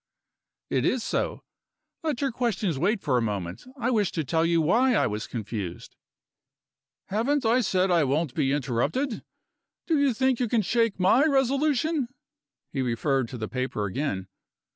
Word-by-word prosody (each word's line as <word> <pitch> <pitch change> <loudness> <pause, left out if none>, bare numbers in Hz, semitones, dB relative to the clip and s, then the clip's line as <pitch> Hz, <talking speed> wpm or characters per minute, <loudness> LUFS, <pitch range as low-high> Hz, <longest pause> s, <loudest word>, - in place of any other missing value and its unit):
"It - - +1
is 255 -3 +1
so. - - -2 0.6
Let 305 -6 -2
your 275 -2 +1
questions 210 - -1
wait 200 +6 +1
for 125 -4 +1
a - - -1
moment. 100 -5 -3
I 250 0 0
wish 210 -5 +1
to 160 - -1
tell 160 +4 +1
you 165 0 +3
why 235 +11 +3
I - - +3
was 105 +1 -3
confused." 105 -6 -5 1.1
"Haven't 245 +7 +1
I 235 +3 +4
said 190 -3 +1
I 170 -3 +4
won't 145 +1 0
be 135 -2 +1
interrupted? 145 - -1 0.6
Do 320 -3 +2
you 275 -4 +2
think 260 0 +2
you 245 - +1
can 225 -2 +2
shake 230 0 +1
my 195 +9 +5
resolution?" 280 +1 +1 0.7
He 135 - -1
referred 130 +1 0
to 125 - -6
the 110 -1 -4
paper 130 -5 -2
again. 95 -3 -2
185 Hz, 165 wpm, -26 LUFS, -, 1.1 s, my